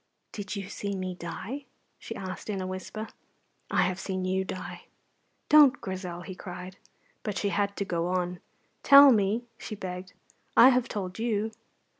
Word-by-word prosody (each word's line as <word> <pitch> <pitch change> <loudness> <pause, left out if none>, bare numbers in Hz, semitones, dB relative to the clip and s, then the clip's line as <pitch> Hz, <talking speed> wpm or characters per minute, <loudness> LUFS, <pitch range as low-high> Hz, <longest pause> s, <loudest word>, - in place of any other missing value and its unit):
"Did 205 0 -5
you 195 -2 -5
see 200 0 -4
me 185 -1 -3
die?" 195 +11 -6 0.3
she 225 - -7
asked, 190 +1 -6
in 200 -2 -1
a 185 - -3
whisper. 185 +4 -5 0.6
"I - - +3
have 185 +1 -1
seen 185 -1 -3
you 190 +1 +1
die." 185 0 -7 0.6
"Don't, 290 -4 +7
Grizel!" 185 -2 -5
he 185 - -7
cried. 180 0 -8 0.4
But 210 -3 -3
she 200 - 0
had 200 0 0
to 200 - -1
go 170 -2 -1
on. 180 -1 -1 0.4
"Tell 280 0 +9
me," 215 +1 +2 0.2
she 215 - -6
begged; 185 -2 -6 0.4
"I 250 - +10
have 250 -2 +2
told 190 -1 -4
you." 220 -1 0
195 Hz, 165 wpm, -28 LUFS, 185-215 Hz, 0.6 s, I